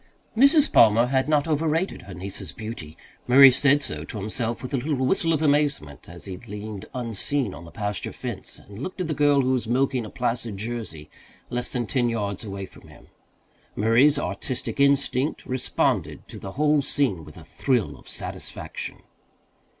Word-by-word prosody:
Mrs. 280 +5 +5
Palmer 115 +1 +6
had 130 +2 +1
not 150 0 +2
over 160 0 +1
rated 165 +5 -1
her 95 0 -10
niece's 95 +3 -7
beauty. 110 -9 -8 0.3
Murray 135 +2 +9
said 140 +2 +3
so - - -5
to 115 - -7
himself 110 +4 -3
with 130 - -6
a - - +2
little 130 0 -1
whistle 165 +3 +1
of 160 -1 +1
amazement 145 - 0
as 85 0 -11
he 95 -2 -6
leaned 105 -1 -8
unseen 120 0 -1
on 80 +4 -10
the 85 - -12
pasture 105 -3 -4
fence - - -7
and 100 +3 -12
looked 185 +5 -6
at 180 - -1
the 160 - -1
girl 145 -1 +4
who 130 0 +1
was 125 -3 0
milking 130 +1 +1
a 110 - -7
placid 120 -4 -2
Jersey 110 -8 -5 0.4
less 120 0 -2
than 125 -2 -1
ten 120 -1 +1
yards 105 -3 -2
away 100 -2 -5
from - - -17
him. - - -17 0.7
Murray's 120 +8 +4
artistic 130 -2 -4
instinct 140 0 +2
responded 130 -1 -1
to - - -9
the 95 - -7
whole 150 +1 +3
scene 130 - 0
with 75 0 -13
a 85 - -11
thrill 120 - 0
of - - -13
satisfaction. - - -6
125 Hz, 180 wpm, -25 LUFS, 105-140 Hz, 0.7 s, Murray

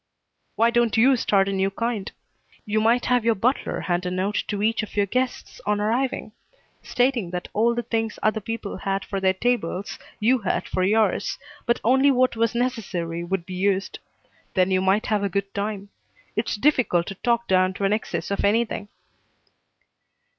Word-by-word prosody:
"Why 230 +1 +3
don't 235 -2 +2
you 260 +4 +6
start 195 -5 +2
a 195 - -1
new 195 0 +1
kind? 220 0 -3 0.5
You 215 +1 +1
might 235 +3 +3
have 245 -1 +2
your 230 0 +3
butler 245 +7 0
hand 175 0 -1
a - - 0
note 185 +3 -1
to 205 -1 -2
each 225 +2 +2
of 215 - -8
your 205 - +4
guests 255 +5 -3
on 205 0 0
arriving, 240 +5 -1 0.5
stating 245 -6 0
that 180 0 -5
all 235 +3 +2
the 240 - -2
things 225 -1 -2
other 215 0 +2
people 225 0 -5
had 195 0 -2
for 195 - -3
their 190 0 +2
tables 200 -4 -1 0.2
you 245 +4 +3
had 200 - -1
for 185 - -2
yours, 215 +4 +1 0.3
but 235 - +2
only 265 +4 +4
what 255 -2 +3
was 230 +1 0
necessary 185 -9 -2
would 175 0 -2
be 185 - -8
used. 195 +1 0 0.6
Then 185 0 +3
you 185 0 +2
might 190 +3 +2
have 210 -2 +1
a 200 - 0
good 200 +1 -2
time. 200 0 -3 0.5
It's 220 +2 -1
difficult 220 - +2
to 195 - -5
talk 235 -1 +1
down 185 0 +2
to 200 - -4
an 195 +1 +3
excess 215 -1 -3
of 200 - -1
anything." 220 0 +1
210 Hz, 180 wpm, -24 LUFS, 195-235 Hz, 0.6 s, you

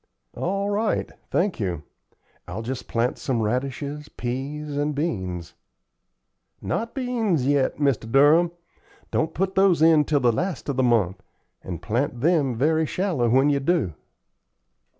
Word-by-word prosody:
"All 195 +2 -1
right. 210 +1 0 0.2
Thank 190 -3 0
you. 90 -7 -2 0.6
I'll 95 +6 -5
just 125 +2 -5
plant 120 +2 0
some 130 -4 -1
radishes, 140 +6 -2
peas, 140 +4 -4
and 145 +1 -1
beans." 95 - -3 1.1
"Not 230 +1 -3
beans 230 - 0
yet, 140 -1 +2
Mr. 135 -6 0
Durham. 150 +6 +5 0.6
Don't 160 - 0
put 190 +2 0
those 190 -4 +4
in 160 -2 +6
till 145 -1 +2
the 125 -2 +3
last 175 - -3
of 140 - -1
the - - +3
month, 110 -7 +2 0.4
and 85 -2 -6
plant 120 - -1
them 150 -6 +2
very 155 +5 +2
shallow 170 -12 0
when 135 +5 +4
you 140 - +2
do." 140 - +1
140 Hz, 140 wpm, -24 LUFS, 120-165 Hz, 1.1 s, in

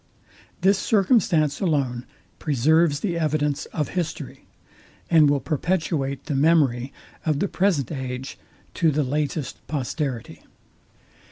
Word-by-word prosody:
This 195 +1 +4
circumstance 190 - +2
alone 135 -9 -1 0.3
preserves 150 +2 +2
the 170 -4 -1
evidence 150 -2 0
of 150 - -3
history, 175 -4 -5 0.6
and 155 -3 +6
will 145 -1 +2
perpetuate 150 -3 -1
the 150 - -3
memory 135 -4 +2 0.3
of 155 -3 +1
the 200 - 0
present 180 - 0
age 130 -2 -5 0.3
to 165 - +2
the 150 0 +1
latest 145 +1 -2
posterity. 135 -3 -3
150 Hz, 110 wpm, -24 LUFS, 135-165 Hz, 0.6 s, and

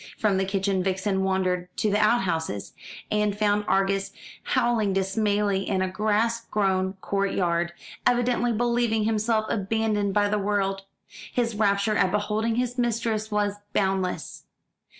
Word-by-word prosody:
From 205 -3 +2
the 190 - +1
kitchen 195 0 0
Vixen 190 +1 0
wandered 185 -2 0
to 215 - +1
the 205 - +2
out 215 +3 +4
houses, 160 - -3 0.4
and 210 -1 +1
found 210 0 +1
Argus 195 0 +1 0.3
howling 240 - +1
dismally 200 0 0
in 190 -2 +1
a - - 0
grass 220 +3 +1
grown 190 -2 0
court 200 0 -1
yard, 170 -1 0 0.4
evidently 245 0 +2
believing 235 -1 +1
himself 220 0 +1
abandoned 210 -1 0
by 205 0 +3
the 210 +1 0
world. 195 -1 -1 0.5
His 235 -2 0
rapture 210 0 +1
at 185 - +3
beholding 210 +3 0
his 245 +1 -1
mistress 225 -2 0
was 205 -1 0 0.2
boundless. 190 -2 -1
205 Hz, 140 wpm, -25 LUFS, 195-220 Hz, 0.5 s, out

